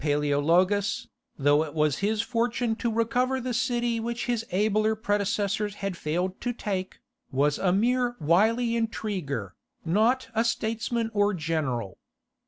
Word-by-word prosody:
_) - - -12
Michael 150 - +1
Paleologus, 175 +8 +2 0.3
though 145 +2 +4
it 155 0 -8
was 150 -2 +1
his 210 +2 +1
fortune 230 0 0
to 235 -1 -1
recover 245 +4 +1
the 250 0 -3
city 240 -1 0
which 235 +1 -3
his 240 -2 -1
abler 215 +3 +2
predecessors 205 -1 -1
had 195 -2 -3
failed 175 +4 -2
to 245 - -1
take, 190 -5 -4 0.3
was 145 +2 +1
a 185 - +2
mere 245 +5 +2
wily 225 +9 +3
intriguer, 185 - -3 0.3
not 220 +9 +2
a 225 0 +2
statesman 230 0 -1
or 205 -1 +2
general. 150 - -2
210 Hz, 145 wpm, -27 LUFS, 170-230 Hz, 0.3 s, though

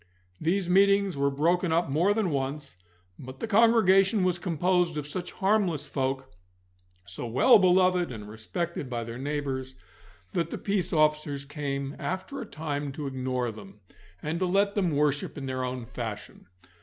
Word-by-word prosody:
These 180 +3 0
meetings 200 +1 +4
were 140 0 +1
broken 165 +5 +1
up 170 +1 +2
more 165 +8 +2
than 205 -4 +1
once, 140 -2 -3 0.4
but 130 0 -10
the - - -2
congregation 215 -3 +4
was 180 -1 +1
composed 175 -1 +1
of 150 - -3
such 175 +5 -5
harmless 190 -7 +1
folk, 135 -1 -3 0.7
so 90 +7 -6
well 130 - +6
beloved 180 -3 +3
and 105 -3 -8
respected 130 - -4
by 120 -2 -3
their 115 +1 -7
neighbours, 135 -2 -3 0.6
that 165 -1 0
the - - -4
peace 195 -3 -1
officers 150 -2 +1
came 140 -1 -4
after 190 +10 -4
a 230 - -7
time 145 -3 -4
to 145 +1 -5
ignore 130 -2 -2
them, 105 -3 -13 0.4
and 160 +3 -2
to 185 - +1
let 200 +2 +2
them 195 -4 +1
worship 145 -1 0
in 140 - -5
their 130 -1 -3
own 125 -1 -4
fashion. 110 -5 -7
150 Hz, 160 wpm, -27 LUFS, 135-185 Hz, 0.7 s, well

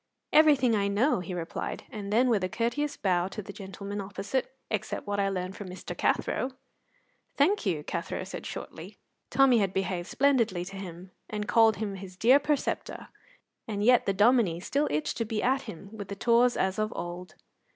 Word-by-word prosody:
"Everything 285 -6 +6
I 200 -1 +1
know," 205 +6 +2
he 180 +1 -6
replied, 170 -1 -4
and 205 -4 -6
then, 240 +4 +4
with 220 -6 +2
a 185 - 0
courteous 260 +8 -1
bow 180 -2 +1
to 205 +2 -6
the 200 - -9
gentleman 200 +1 -6
opposite, 205 +7 -3 0.2
"except 215 -3 -3
what 205 0 -2
I 195 0 +2
learned 185 0 -3
from 200 -3 -7
Mr. 185 - -7
Cathro." 260 +1 0 0.8
"Thank 305 - +2
you," 160 -5 0
Cathro - - -4
said - - -7
shortly. - - -8 0.3
Tommy 265 -3 +5
had 195 -2 0
behaved 185 -2 -1
splendidly 230 -10 +2
to 195 +2 -9
him, 185 -1 -8 0.2
and 210 -1 -3
called 225 -2 +5
him 205 0 -3
his 190 -1 -9
dear 250 +7 +6
preceptor, 290 -1 -2 0.6
and 205 -2 -2
yet 245 +2 +5
the 195 - +2
Dominie 210 -4 +4
still 280 +10 0
itched 150 0 -1
to 230 - 0
be 220 -1 -2
at 265 +2 +1
him 195 +4 -9
with 205 -3 -7
the 200 - -5
tawse 240 +3 +3
as 190 +1 0
of 215 +1 0
old. 175 +1 -6
205 Hz, 185 wpm, -28 LUFS, 190-245 Hz, 0.8 s, Everything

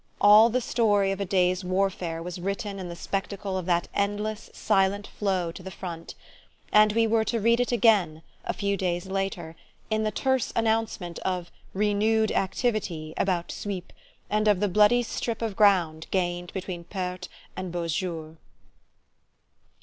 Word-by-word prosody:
All 210 +3 +8
the 255 +2 0
story 205 -5 +2
of 195 0 -3
a - - 0
day's 185 0 +1
warfare 180 -3 -1
was 180 +1 -6
written 200 +1 -3
in 180 -2 -6
the 170 - -6
spectacle 195 +2 -3
of 185 -2 -3
that 175 -1 +1
endless 205 +2 -2
silent 200 0 +1
flow 185 -4 -1
to 175 - -10
the 190 - -7
front: 170 -3 -7 0.6
and 210 0 +6
we 230 +1 +3
were 225 0 +2
to 230 - 0
read 230 +2 +3
it 245 - +1
again, 200 -9 +3 0.2
a - - -1
few 200 -1 -1
days 175 -1 -1
later, 190 -4 -3 0.4
in 215 0 +1
the 215 - +1
terse 265 +4 0
announcement 220 -6 -1
of 180 -2 -3 0.2
"renewed 210 +2 +2
activity" 190 -6 -1
about 180 -3 0
Suippes, 195 -3 -5 0.3
and 215 +1 +1
of 205 -3 +4
the 205 - +2
bloody 210 +5 +4
strip 230 0 -3
of 220 -3 -2
ground 175 -7 +3
gained 175 -2 -1
between 180 -2 -5
Perthes 185 -1 -5 0.3
and 185 -1 -5
Beausejour. 165 -2 -3
195 Hz, 155 wpm, -26 LUFS, 180-215 Hz, 0.6 s, All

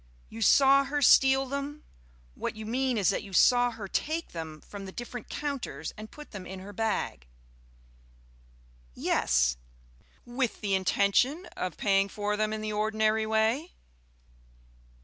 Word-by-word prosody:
"You 225 - -9
saw 275 +4 +6
her 290 +1 -1
steal 265 +1 +6
them? 280 +2 -5 0.5
What - - -4
you 220 0 -7
mean 255 +2 0
is 200 -2 +3
that - - -2
you 200 -2 -11
saw 245 +5 +5
her 225 -4 -7
take 315 +11 -2
them 160 -2 -7
from 200 -1 -9
the - - -7
different 240 +1 -7
counters 285 -3 -4
and 215 0 -9
put 300 0 -12
them 195 -4 -8
in 190 - -7
her 200 +2 -10
bag?" 210 - -2 1.7
"Yes." - - +1 0.7
"With 245 0 -2
the 200 -2 -1
intention 200 - +2
of 185 -2 -4
paying 195 -1 +2
for 210 0 -2
them 215 0 0
in 215 0 -3
the 215 0 -3
ordinary 215 +1 +1
way?" 220 +9 +1
220 Hz, 150 wpm, -28 LUFS, 200-265 Hz, 1.7 s, saw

